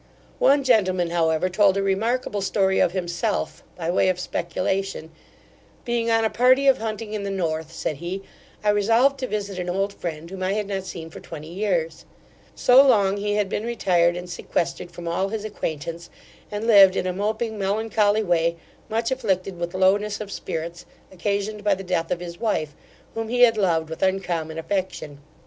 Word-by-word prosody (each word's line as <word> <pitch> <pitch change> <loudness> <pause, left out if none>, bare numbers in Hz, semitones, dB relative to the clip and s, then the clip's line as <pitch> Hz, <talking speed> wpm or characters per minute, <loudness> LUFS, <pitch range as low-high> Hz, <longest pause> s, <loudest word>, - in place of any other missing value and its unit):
One 280 +1 +4
gentleman, 185 -8 +2
however, 165 0 +2
told 195 +1 +3
a 195 - +1
remarkable 210 +2 0
story 190 -1 +1
of - - +3
himself, 180 +3 -2
by 170 -1 -2
way 185 - +3
of 180 -1 0
speculation 185 -1 -2 0.7
'Being 235 -1 0
on 225 -1 +3
a - - +2
party 255 +3 +4
of 270 -2 +5
hunting 220 -1 -4
in 210 - -2
the 200 - -3
North 160 -4 -2
(said 155 -3 -3
he), 180 +5 -5 0.4
I 210 - +2
resolved 230 +7 +3
to 255 - -2
visit 200 -4 -3
an 180 0 -3
old 195 +2 -1
friend, 165 -3 -6
whom 190 -1 -7
I 185 +1 0
had 210 0 -1
not 195 -1 -4
seen 165 -3 -7
for - - -9
twenty 155 -1 -9
years 175 -5 -1 0.5
So 250 +1 +7
long 205 -8 +4
he 205 0 -1
had 210 -1 +1
been 205 - -3
retired 175 -7 +2
and 180 0 -6
sequestered 175 0 -3
from 175 0 -9
all 175 +3 0
his 215 0 -4
acquaintance, 165 -4 -5 0.4
and 210 +1 -4
lived 200 -4 +7
in - - -1
a 185 - -1
moping 220 +3 -2
melancholy 210 +1 +1
way, 170 -3 +1 0.3
much 230 +3 -1
afflicted 195 -7 -1
with 175 +1 -4
lowness 200 +3 +2
of 210 -2 -6
spirits, 170 0 -5 0.3
occasioned 205 +3 -2
by 205 -1 +3
the 195 - -8
death 180 -3 -1
of 175 - -2
his 175 -1 -7
wife, 155 -10 -1 0.4
whom 225 0 -3
he 245 +2 0
had 235 -2 +7
loved 170 -6 +1
with 160 0 -8
uncommon 175 -4 -1
affection. 165 -4 -3
195 Hz, 185 wpm, -23 LUFS, 175-215 Hz, 0.7 s, So